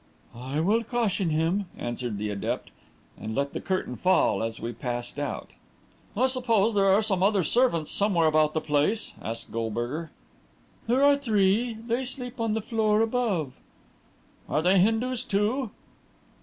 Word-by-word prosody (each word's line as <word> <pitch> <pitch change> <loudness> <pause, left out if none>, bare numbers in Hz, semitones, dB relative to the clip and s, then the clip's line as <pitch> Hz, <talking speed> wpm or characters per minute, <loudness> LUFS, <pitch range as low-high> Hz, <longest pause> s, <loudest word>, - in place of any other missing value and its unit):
"I 130 +5 -4
will 215 +7 +2
caution 220 -6 0
him," 165 +6 +1
answered 120 -2 -4
the 105 +1 -3
adept, 100 -1 -3 0.5
and 110 +1 -5
let 140 0 -1
the - - -4
curtain 185 -9 -2
fall, 185 - +3
as 115 0 -3
we 115 +2 -4
passed 120 +3 -4
out. 145 -2 -4 0.7
"I 250 - +4
suppose 230 -5 +2
there 195 -1 +3
are 200 +3 +4
some 195 -4 0
other 195 -1 +3
servants 200 -8 +2
somewhere 195 -5 +2
about 155 0 +3
the 160 - +1
place?" 150 +9 0
asked 115 +1 -6
Goldberger. 120 +8 -3 0.8
"There 250 +4 +3
are 285 0 +6
three 225 -3 +1
they 235 +2 0
sleep 250 -1 -6
on 225 -1 0
the 220 - -2
floor 220 -2 +2
above." 220 - 0 1.0
"Are 155 - +1
they 185 +2 +4
Hindus, 225 +5 +1
too?" 225 +3 0
195 Hz, 155 wpm, -27 LUFS, 145-230 Hz, 1.0 s, are